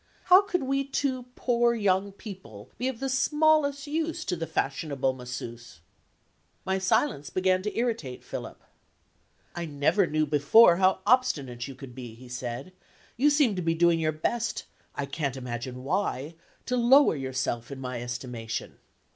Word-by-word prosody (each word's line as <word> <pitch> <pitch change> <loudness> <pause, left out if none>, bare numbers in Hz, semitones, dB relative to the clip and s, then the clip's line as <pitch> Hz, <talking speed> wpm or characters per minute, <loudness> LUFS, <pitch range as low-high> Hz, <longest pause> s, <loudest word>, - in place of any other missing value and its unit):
How 370 +2 +7
could 360 -6 -2
we 275 +1 0
two 265 -2 -2
poor 235 -1 +2
young 200 -2 +1
people 185 - -11
be 250 - 0
of 260 -3 -3
the 270 - -2
smallest 290 +1 +2
use 320 +2 -2
to 180 - -1
the 165 -1 -4
fashionable 135 -1 -1
Masseuse? 120 -5 -8 0.9
My 190 0 0
silence 185 - +1
began 185 0 +1
to 210 +2 -4
irritate 225 - -2
Philip. - - -7 0.9
"I 175 -1 -4
never 150 +6 +2
knew 155 0 +1
before 160 +7 +6
how 190 0 +3
obstinate 145 - +1
you 135 - -9
could 130 -2 -10
be," 120 -3 -9
he 125 +2 -14
said; 125 +6 -5 0.4
"you 280 +5 +4
seem 290 -8 +3
to 180 - -2
be 165 -1 0
doing 170 0 +3
your 155 -1 +1
best 220 +10 -2 0.3
I 140 - -2
can't 140 -1 -3
imagine 125 0 -6
why 155 -2 -1 0.3
to 250 - -1
lower 250 - +5
yourself 130 -3 -3
in 140 -1 -7
my 125 -2 -4
estimation." 120 -2 -5
170 Hz, 155 wpm, -27 LUFS, -, 0.9 s, How